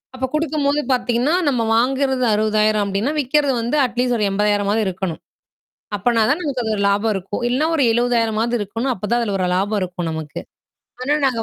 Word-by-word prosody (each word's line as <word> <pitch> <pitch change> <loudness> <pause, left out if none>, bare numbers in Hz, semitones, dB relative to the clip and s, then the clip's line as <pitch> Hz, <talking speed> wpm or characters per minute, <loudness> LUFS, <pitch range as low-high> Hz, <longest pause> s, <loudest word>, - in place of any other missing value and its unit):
அப்ப 260 - -2
கொடுக்கும்போத 300 -2 0
பாத்தீங்கன்னா, 245 +4 +1
நாம 240 -5 +1
வாங்குறது 265 +2 +1
ரூ.60000 215 0 +2
அப்பிடின்னா, 200 +7 -1
விக்கிறது 285 0 +1
வந்து 240 +6 -1
அட்லீஸ்ட் 245 0 0
ஒரு 215 - -1
ரூ.80000ஆது 205 +1 +1
இருக்கணும். 185 -3 -4 0.8
அப்பன்னா 225 +3 +1
தான் 295 +7 +1
நமக்கு 275 -5 -2
அதுல 220 -1 -1
லாபம் 205 +2 +2
இருக்கும். 195 +4 -4
இல்லன்னா 265 +6 +1
ஒரு 295 - +2
ரூ.70000ஆவது 235 -1 +1
இருக்கணும். 225 +5 -3
அப்பதான் 230 +4 -1
அதுல 210 -4 -1
ஒரு 185 - 0
லாபம் 205 +3 0
இருக்கும் 180 -2 -4
நமக்கு. 160 -2 -5 0.6
ஆனா, 290 +3 +1
நாங்க 250 -4 +1
230 Hz, 165 wpm, -20 LUFS, 205-260 Hz, 0.8 s, ரூ.60000